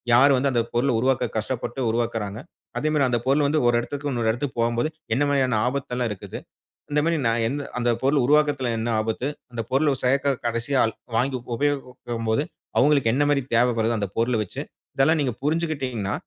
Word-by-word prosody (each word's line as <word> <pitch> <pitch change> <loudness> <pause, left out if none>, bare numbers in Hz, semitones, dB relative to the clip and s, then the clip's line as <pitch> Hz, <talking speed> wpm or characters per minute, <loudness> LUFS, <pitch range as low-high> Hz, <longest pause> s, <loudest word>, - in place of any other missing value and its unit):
யார் 135 +2 +6
வந்து 140 +1 +1
அந்த 120 -1 +2
பொருளை 125 +2 +2
உருவாக்க 125 -2 +1
கஷ்டப்பட்டு 125 +3 -3
உருவாக்குகிறாங்க? 115 -2 -2 0.4
அதே 155 - -1
மாதிரி 140 -4 +3
அந்த 120 - +1
பொருள் 140 +2 +3
வந்து 155 0 +2
ஒரு 120 - +2
இடத்துக்கு 145 +3 -4
இன்னொரு 115 -2 +1
இடத்துக்கு 125 +1 -4
போகும்போது 120 +4 +1 0.3
என்ன 145 - +2
மாரியான 130 -5 +2
ஆபத்து 140 0 -3
எல்லாம் 125 -2 0
இருக்குது? 95 - -7 0.5
இந்த 150 - +2
மாதிரி 165 0 +2
நான் 115 0 +2
எந் 135 +5 -2 0.2
அந்த 120 0 +1
பொருள் 140 +1 +3
உருவாக்குறதுல 145 -2 +3
என்ன 115 +1 -2
ஆபத்து? 110 +4 -2 0.2
அந்த 120 -1 -3
பொருள் 140 +3 +3
ஒரு 135 - -2
சேர்க்க 140 +2 +2
கடைசி 115 +3 -2
ஆள் 110 - +2 0.2
வாங்கி 130 +3 +1 0.2
உபயோகிக்கும் 125 -4 -2
போது 110 +6 +2 0.3
அவங்களுக்கு 140 -5 +4
என்ன 145 +3 +2
மாரி 145 -1 +3
தேவை 120 +2 +4
வருது 110 +1 +2
அந்த 100 -2 -1
பொருளை 115 +1 +1
வச்சு? 105 - -5 0.3
இதெல்லாம் 155 +4 +3
நீங்க 135 -4 0
புரிஞ்சிக்கிட்டீங்கனா 140 -9 -1
125 Hz, 190 wpm, -24 LUFS, 115-140 Hz, 0.5 s, யார்